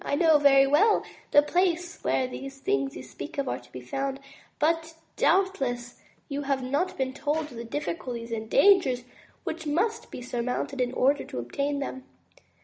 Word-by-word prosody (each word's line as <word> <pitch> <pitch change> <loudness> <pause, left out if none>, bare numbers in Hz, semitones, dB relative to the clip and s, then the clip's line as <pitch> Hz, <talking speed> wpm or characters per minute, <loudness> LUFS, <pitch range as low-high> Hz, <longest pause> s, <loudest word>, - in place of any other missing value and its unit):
I - - 0
know 320 -1 +5
very 275 -1 +6
well 375 +11 +4 0.3
the 290 - +6
place 350 +1 0
where 260 - +1
these 270 +2 -7
things 135 - -1
you 125 - -7
speak 140 - -9
of 280 -1 -1
are - - -2
to 125 - -20
be 125 - -8
found, 270 - -3 0.4
but 325 +1 0 0.2
doubtless 265 -11 +1 0.3
you 285 -1 -3
have 275 -2 -1
not 285 +8 -1
been 260 -1 -1
told 300 +2 -2
of - - -11
the 230 - -5
difficulties 240 -3 -4
and 220 -1 -4
dangers 275 - +5 0.4
which 320 -1 -4
must 430 +10 0
be 250 - -8
sur 245 -1 -3
mounted 250 +2 -2
in 245 -1 +1
order 275 +3 +2
to - - -8
obtain 280 - -2
them. 265 -2 -5
275 Hz, 180 wpm, -27 LUFS, 245-320 Hz, 0.4 s, very